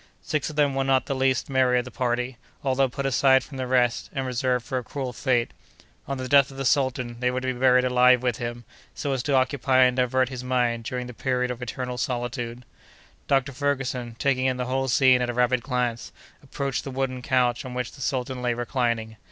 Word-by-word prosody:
Six 150 -3 -1
of 155 - -9
them 145 -2 +2
were 135 0 0
not 135 -1 +2
the - - -2
least 130 -1 +1
merry 130 -2 +2
of 125 - 0
the 125 - -9
party, 125 +1 -2 0.3
although 135 0 +2
put 140 +2 -4
aside 130 0 +4
from 140 - -10
the 130 -1 -3
rest, 125 -2 +1
and 135 -3 -2
reserved 125 -1 -1
for 130 - -2
a - - -8
cruel 130 0 -5
fate. 120 -1 0 0.6
On 140 - -3
the 130 0 -4
death 140 0 +5
of 135 - -12
the 135 - -3
sultan, 130 -3 0
they 125 0 +1
were 125 0 -1
to 130 0 -1
be 120 - -10
buried 125 -1 +4
alive 125 0 +4
with 125 -3 0
him, 120 0 -5 0.3
so 140 - -2
as 130 - -1
to 140 +2 0
occupy 130 0 +3
and 125 -1 +3
divert 130 0 +2
his 130 -2 -6
mind 120 -2 0
during 125 0 -3
the 125 - -8
period 125 +3 -1
of 125 0 -7
eternal 125 0 -4
solitude. 120 -2 -3 0.6
Dr. 135 0 +2
Ferguson, 130 -4 -2
taking 130 -1 +1
in 130 -1 0
the 125 - -2
whole 135 +1 -1
scene 130 0 +4
at 125 - -1
a 120 - -3
rapid 125 0 +2
glance, 125 -2 -2 0.3
approached 140 -2 -3
the - - -6
wooden 130 -1 -2
couch 125 -1 +1
on 130 -2 -7
which 125 -1 -3
the 135 - -13
sultan 130 -1 -2
lay 120 -1 0
reclining. 115 -2 -2
125 Hz, 225 wpm, -25 LUFS, 125-135 Hz, 0.6 s, death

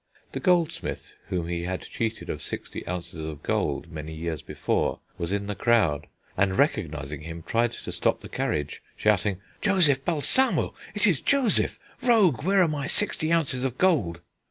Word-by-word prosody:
The - - -3
goldsmith 175 -4 0
whom 85 -2 -2
he 85 0 -2
had 90 +1 -3
cheated 115 -1 -3
of - - -5
sixty - - -5
ounces 85 -3 -4
of 80 -1 -6
gold 85 - -1
many 80 0 -6
years 80 -1 -3
before - - -1 0.2
was 85 +1 -2
in 100 0 -1
the 105 - -2
crowd, 95 -11 +2 0.3
and, 95 0 +2
recognising 75 +2 0
him, 80 +1 -7
tried 115 +4 +1
to - - -7
stop - - +1
the - - -8
carriage, 75 -2 -2
shouting: 105 -2 +1 0.2
"Joseph 165 -10 +4
Balsamo! 175 - +2 0.2
It 210 - +3
is 175 - +3
Joseph! 270 -6 +2 0.2
Rogue, 205 - +4
where 195 +2 +4
are - - +3
my 145 -3 -2
sixty 165 -5 +2
ounces 140 -7 +1
of 130 -2 -2
gold?" 125 - +2
110 Hz, 165 wpm, -26 LUFS, -, 0.3 s, Joseph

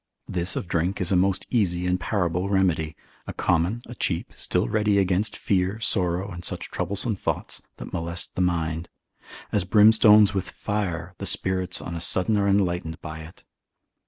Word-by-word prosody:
This 90 0 -1
of - - -4
drink 85 +3 -1
is 90 0 0
a - - +3
most 95 +1 +1
easy 90 -7 +1
and 90 0 0
parable 90 -2 -1
remedy, 85 -6 +1 0.3
a - - -5
common, 90 +8 0
a - - -9
cheap, 85 -7 -2
still - - 0
ready 105 - +1
against 95 +2 0
fear, 95 +2 0
sorrow, 95 -2 -1
and 90 -1 -8
such - - -2
troublesome 100 +5 0
thoughts, - - -3 0.2
that - - -9
molest 85 0 -4
the - - -2
mind; 85 -2 -1 0.6
as 105 - +1
brimstone 105 +2 +6
with 95 -1 -2
fire, 90 -5 -3
the - - -2
spirits 95 -1 +1
on 85 - -6
a 85 - -5
sudden 95 +5 +3
are 100 -1 +1
enlightened 90 -4 0
by 80 -1 -8
it. 80 +2 -13
90 Hz, 170 wpm, -24 LUFS, 85-100 Hz, 0.6 s, brimstone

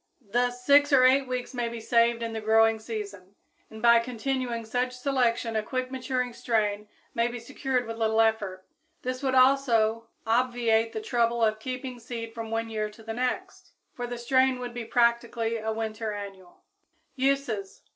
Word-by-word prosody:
Thus 245 +1 0
six 285 +1 +6
or 265 -2 +6
eight 265 +1 +4
weeks 250 +1 -4
may 240 -2 -2
be 235 0 -6
saved 235 +1 +2
in 230 -1 -3
the 220 - -4
growing 220 +1 +4
season, 200 -4 -7 0.3
and 220 0 -11
by 235 0 +7
continuing 245 0 -3
such 250 +3 -1
selection 250 -3 0
a 220 - +2
quick 255 +3 -3
maturing 255 -1 -2
strain 210 -3 -1 0.3
may 235 0 +1
be 240 0 -5
secured 255 +1 -2
with 225 0 -6
little 220 -1 +1
effort. 205 -4 +1 0.4
This 255 +1 -3
would 265 -2 0
also 235 -4 +3 0.2
obviate 230 -1 +2
the 220 - -3
trouble 235 +1 +1
of 215 -1 +2
keeping 255 +1 -5
seed 230 -1 -6
from 225 -1 -6
one 225 0 -2
year 215 -1 -2
to 215 +2 -15
the 225 0 -5
next, 255 +11 -4 0.2
for 245 -1 -5
the 245 0 -5
strain 260 +2 +2
would 245 -1 -6
be 240 -1 -5
practically 235 -1 +1
a 220 0 -3
winter 220 0 -3
annual. 195 -3 -9 0.5
_Uses. 260 -7 -1
235 Hz, 175 wpm, -27 LUFS, 220-250 Hz, 0.5 s, by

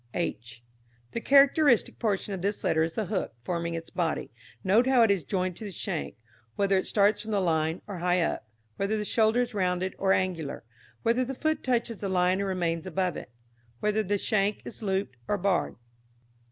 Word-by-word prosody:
h. 120 -8 -4 0.5
The 230 - -3
characteristic 275 -1 +4
portion 205 -2 -1
of 190 - -4
this 200 +2 -2
letter 160 - +2
is 165 0 0
the 220 - -2
hook 185 - -3
forming 170 +2 -2
its 165 0 -7
body. 165 -3 -2 0.3
Note 215 +7 +4
how 260 -3 +5
it 220 - +4
is 195 -5 +1
joined 185 +2 -1
to - - -8
the 210 - -5
shank 185 -3 -4 0.4
whether 200 -1 +2
it 190 - +1
starts 205 0 +3
from 220 - -8
the 205 -2 +1
line 160 -2 0
or 195 -4 -6
high 180 +1 +2
up; - - -2 0.3
whether 200 +2 0
the 210 - -2
shoulder 220 +3 +3
is 245 -1 -2
rounded 185 -1 0
or 190 0 +2
angular, 180 -6 -1 0.4
whether 235 +3 +2
the 265 +2 -4
foot 315 +4 -1
touches 235 -3 0
the 195 - -4
line 185 +1 +2
or 200 - -1
remains 170 -3 -1
above 185 -1 -1
it; - - -7 0.5
whether 210 +1 +1
the 205 0 0
shank 205 0 0
is 235 - -9
looped 190 - -2
or 205 - +1
barred. 195 -2 0
195 Hz, 195 wpm, -28 LUFS, 180-220 Hz, 0.5 s, how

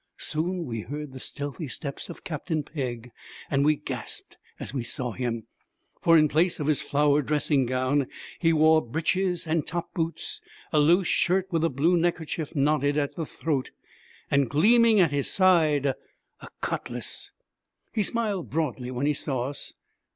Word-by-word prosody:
Soon 170 +3 -1
we 115 -3 -4
heard 145 +2 -6
the 130 - -8
stealthy 145 +4 -4
steps 140 +2 -4
of - - -9
Captain 155 -1 -3
Pegg, 125 -5 -5 0.4
and 140 -1 +3
we 150 +1 +4
gasped - - -7 0.2
as - - -6
we 135 - -1
saw 120 +1 -2
him; 115 -1 -3 0.6
for 165 -1 +6
in 155 -1 +5
place 165 +5 +2
of 150 - -2
his 150 -2 +2
flowered 145 -1 +2
dressing 145 -3 +2
gown 130 +2 +1 0.3
he 165 -2 +3
wore 160 0 +5
breeches 175 +8 -1
and 160 -1 0
top 170 0 -4
boots, 165 -2 -3 0.3
a 155 - +5
loose 170 +6 +4
shirt 185 +3 +2
with 165 -2 +1
a 165 - +3
blue 160 +6 +2
neckerchief 165 -2 -1
knotted 145 0 +2
at 145 -2 0
the 165 -3 -4
throat, 145 -5 -2 0.6
and, 140 -3 +3
gleaming 220 - +5
at 170 -5 +4
his 140 -1 -1
side, 165 -7 +4
a 135 - -6
cutlass. - - -4 0.6
He 220 - +1
smiled 205 -4 -1
broadly 135 -5 -2
when 130 +2 -2
he 150 - +3
saw 135 -3 -1
us. 145 - -5
150 Hz, 165 wpm, -26 LUFS, 140-165 Hz, 0.6 s, for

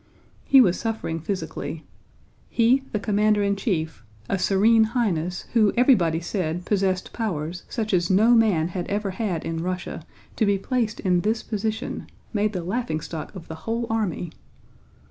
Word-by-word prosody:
He 270 -1 +7
was 185 -7 +3
suffering 220 -8 -3
physically. 160 -3 -4 0.6
He, 240 +3 +3
the 210 - -1
commander 210 0 +2
in 200 0 +1
chief, 160 - -2 0.2
a 195 - -1
Serene 220 +4 +4
Highness 180 -6 0
who 215 -4 +4
everybody 185 - +4
said 175 -1 -3
possessed 190 -2 0
powers 175 -6 -3
such 220 -3 -2
as 175 -1 +2
no 210 +5 +5
man 200 -8 +3
had 180 -1 -4
ever 205 -1 -1
had 185 -5 -2
in 165 0 -2
Russia, 180 +1 -4 0.4
to 220 - +3
be 200 -1 +3
placed 225 +1 -1
in 180 -3 +2
this 220 +3 0
position—made 215 0 -3
the 180 -3 -3
laughingstock 165 -5 -3
of 170 -3 -9
the - - -6 0.2
whole 230 +1 0
army! 190 -7 -1
195 Hz, 150 wpm, -24 LUFS, 175-220 Hz, 0.6 s, He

